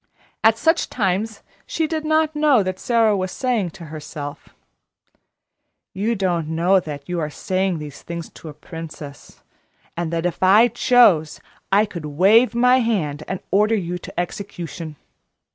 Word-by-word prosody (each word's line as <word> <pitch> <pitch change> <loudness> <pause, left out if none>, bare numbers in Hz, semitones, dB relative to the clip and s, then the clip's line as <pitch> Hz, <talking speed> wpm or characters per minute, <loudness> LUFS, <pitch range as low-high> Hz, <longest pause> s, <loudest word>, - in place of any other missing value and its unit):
At 225 0 +5
such 325 +6 +1
times 205 0 -1 0.2
she 320 - -1
did 315 0 -3
not 310 0 +1
know 295 -7 +4
that 185 0 -4
Sara 230 -3 +2
was 185 -1 -2
saying 240 -8 -1
to 170 - -9
herself: 145 -1 -8 1.4
"You 215 +5 -1
don't 175 -5 -1
know 170 +4 +3
that 145 -4 -8
you 175 -1 -2
are 155 -2 -2
saying 185 +3 -1
these 150 -2 -9
things 170 -1 -6
to 160 - -11
a - - -9
princess, 150 -2 -10 0.5
and 170 -1 -3
that 165 0 -2
if 175 - -2
I 205 +6 +6
chose 195 -13 +4 0.3
I 205 +2 +5
could 170 -6 -8
wave 210 - +4
my 250 +2 +5
hand 180 - -1
and 190 - -4
order 210 +3 +3
you 180 -3 -3
to - - -7
execution. 170 -3 -6
185 Hz, 155 wpm, -21 LUFS, 165-225 Hz, 1.4 s, I